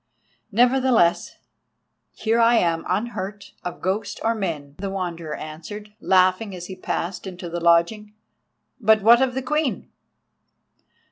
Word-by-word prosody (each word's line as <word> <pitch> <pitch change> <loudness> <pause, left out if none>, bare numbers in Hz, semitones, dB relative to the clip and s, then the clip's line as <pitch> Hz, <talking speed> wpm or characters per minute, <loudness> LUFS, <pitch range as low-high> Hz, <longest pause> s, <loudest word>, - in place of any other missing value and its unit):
"Nevertheless, 245 -5 +3 0.8
here 225 +1 0
I 235 +1 +5
am 165 -6 +1
unhurt, 205 -2 -3
of 180 - -6
ghost 200 +3 -2
or 230 - +2
men," 160 -10 -4
the 195 0 -3
Wanderer 170 -5 -4
answered, 205 +7 -8
laughing, 185 +2 +2
as 180 -1 -7
he 190 - -8
passed 185 +1 -4
into 180 -2 -7
the 175 +1 -3
lodging. 170 +6 +2 0.6
"But 220 -2 +4
what 235 +3 +7
of 260 -1 +1
the 265 - -2
Queen?" 300 +1 -1
195 Hz, 130 wpm, -23 LUFS, 175-225 Hz, 0.8 s, what